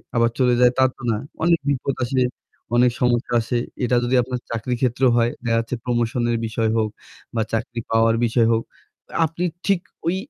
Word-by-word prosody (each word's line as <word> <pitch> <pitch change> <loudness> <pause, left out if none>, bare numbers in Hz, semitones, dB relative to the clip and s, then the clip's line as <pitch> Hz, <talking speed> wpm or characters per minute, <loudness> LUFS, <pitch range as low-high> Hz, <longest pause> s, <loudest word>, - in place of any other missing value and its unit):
আবার 115 0 +4
চলে 125 -1 +4
যায়, 125 0 +6
তা 130 - +5
তো - - -16
না। 105 - 0 0.3
অনেক 170 0 +4
বিপদ 140 0 0
আসে, 130 +1 0 0.5
অনেক 125 0 +5
সমস্যা 120 0 +1
আসে। 120 +2 -1 0.3
এটা 125 0 +2
যদি 125 +2 +1
আপনার 125 0 -4
চাকরির 115 +2 -2
ক্ষেত্রও 125 +1 +3
হয়, 120 0 +3
দেখা 115 -1 +1
যাচ্ছে 115 +2 -3
promotion-এর 120 -1 0
বিষয় 110 0 0
হোক 110 -1 +1 0.5
বা 115 - +1
চাকরি 115 +1 -2
পাওয়ার 115 0 +4
বিষয় 115 0 +3
হোক, 115 - 0 0.6
আপনি 170 +3 -3 0.2
ঠিক 195 -3 +2 0.3
ওই 175 - +2
120 Hz, 180 wpm, -22 LUFS, 115-130 Hz, 0.6 s, যায়